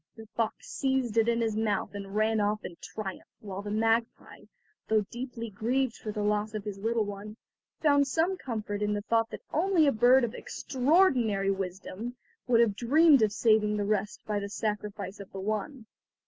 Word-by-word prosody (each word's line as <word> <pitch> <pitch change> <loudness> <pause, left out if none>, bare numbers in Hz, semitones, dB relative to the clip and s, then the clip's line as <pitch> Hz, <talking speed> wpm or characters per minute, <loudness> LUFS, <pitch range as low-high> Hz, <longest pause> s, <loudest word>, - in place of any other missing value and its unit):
The 225 - -11
fox 225 -2 -2
seized 265 -4 -1
it 225 +1 +3
in 235 0 +1
his 220 -2 0
mouth 215 -3 -1
and 200 0 -7
ran 215 +1 +2
off 210 +1 -1
in 175 - -7
triumph, 195 -4 -7
while 195 -2 -6
the 205 - -6
magpie, 225 +2 -1 0.4
though 215 -2 +2
deeply 240 -2 -6
grieved 240 +4 0
for 215 - -6
the 210 0 -3
loss 210 +1 0
of 210 - -3
his 200 -2 -6
little 225 +1 0
one, 205 +2 -7 0.4
found 285 -2 +4
some 330 +7 +1
comfort 215 - -4
in 210 0 +1
the 205 0 -3
thought 225 +1 +1
that - - -8
only 345 0 +3
a 280 - +4
bird 245 +3 +5
of 235 -1 -1
extraordinary 255 - +2
wisdom 195 +5 -5 0.3
would 235 -2 +5
have 215 -4 +2
dreamed 285 +4 +5
of 215 -2 +3
saving 210 -1 +3
the 205 - -1
rest 210 0 -2
by 210 -1 -1
the 200 0 -5
sacrifice 210 -2 -4
of 200 - -10
the 195 - -7
one. 215 +5 -3
220 Hz, 190 wpm, -29 LUFS, 205-245 Hz, 0.4 s, bird